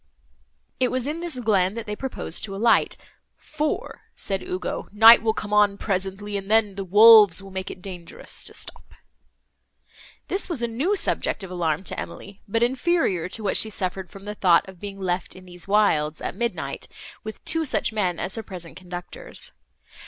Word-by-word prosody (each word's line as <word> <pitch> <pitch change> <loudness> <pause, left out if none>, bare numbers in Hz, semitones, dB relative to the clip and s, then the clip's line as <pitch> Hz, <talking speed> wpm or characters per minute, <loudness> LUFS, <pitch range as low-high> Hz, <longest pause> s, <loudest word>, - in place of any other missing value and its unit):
It 255 -1 +3
was 255 -1 -2
in 300 +3 -3
this 340 -6 -3
glen, 200 -4 +2
that 230 -1 -5
they 210 -1 -4
proposed 260 -9 -5
to 195 -2 -7
alight, 230 +3 +3 0.4
"For," 305 0 -3
said 195 -1 -3
Ugo, 180 0 -4
"night 225 +3 +9
will 220 -1 +1
come 210 -1 -4
on 205 -1 +4
presently, 195 +1 -2
and 195 0 -7
then 215 -2 +3
the 195 0 -4
wolves 205 0 +7
will 195 - -11
make 190 0 -4
it 180 - -10
dangerous 175 -3 -7
to - - -7
stop." - - -7 1.3
This 385 - +1
was 295 -9 -1
a - - +2
new 275 - 0
subject 225 - -1
of 185 - -8
alarm 170 -1 -1
to - - -4
Emily, 200 0 -8
but 225 +3 +1
inferior 250 - +1
to 220 - -5
what 200 - +2
she 220 - +2
suffered 185 -2 -3
from 195 +3 -12
the 210 - -4
thought 180 -4 +3
of 190 -2 -12
being 200 0 -7
left 180 -1 -2
in 185 0 -13
these 175 0 -8
wilds, 160 -7 +2
at - - -4
midnight, 235 0 -3 0.4
with 215 0 -8
two 325 0 0
such 265 -5 -1
men 185 -5 0
as 185 - -3
her 225 - -2
present 180 -5 -9
conductors. 180 -1 -8
200 Hz, 185 wpm, -24 LUFS, 185-230 Hz, 1.3 s, night